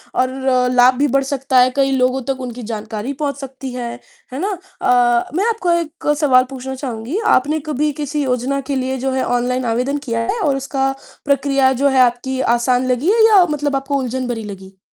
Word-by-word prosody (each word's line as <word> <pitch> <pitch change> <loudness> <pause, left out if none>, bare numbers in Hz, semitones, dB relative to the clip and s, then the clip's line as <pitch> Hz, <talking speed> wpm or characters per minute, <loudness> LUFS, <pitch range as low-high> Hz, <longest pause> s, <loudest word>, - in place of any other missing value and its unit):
और 255 -1 +1
लाभ 250 +1 +6
भी 290 +2 +2
बढ़ 275 - +3
सकता 270 -1 +1
है, 250 +1 +5
कई 275 -1 +2
लोगों 255 0 +1
तक 265 -1 -2
उनकी 245 -1 -6
जानकारी 220 +3 -5
पहुँच 280 -2 -1
सकती 265 -1 -7
है। 240 -1 -4 0.4
है 265 - -4
ना? 395 +5 -1 0.3
अ, 240 -1 +3
मैं 385 +4 +1
आपको 425 -6 0
एक 335 -1 -2
सवाल 260 -5 +5
पूछना 265 0 -6
चाहूँगी। 255 - -4 0.2
आपने 295 +5 +1
कभी 300 +1 0
किसी 295 0 -2
योजना 255 +1 -1
के - - 0
लिए, 260 0 -2
जो 265 +1 -2
है, 260 0 0
ऑनलाइन 245 +1 -1
आवेदन 250 +5 0
किया 230 -1 -1
है 465 - -3
और 285 -7 +1
उसका 270 0 -1 0.3
प्रक्रिया, 275 -1 +2
जो 275 +3 +1
है 265 -1 +2
आपकी, 250 +2 +1
आसान 245 +1 +1
लगी 265 +10 +1
है 445 0 +5
या 400 -5 +6
मतलब 295 -1 -1
आपको 275 +1 -2
उलझन 255 0 -3
भरी 230 -2 -3
लगी? 195 -2 -10
265 Hz, 200 wpm, -18 LUFS, 250-280 Hz, 0.4 s, लाभ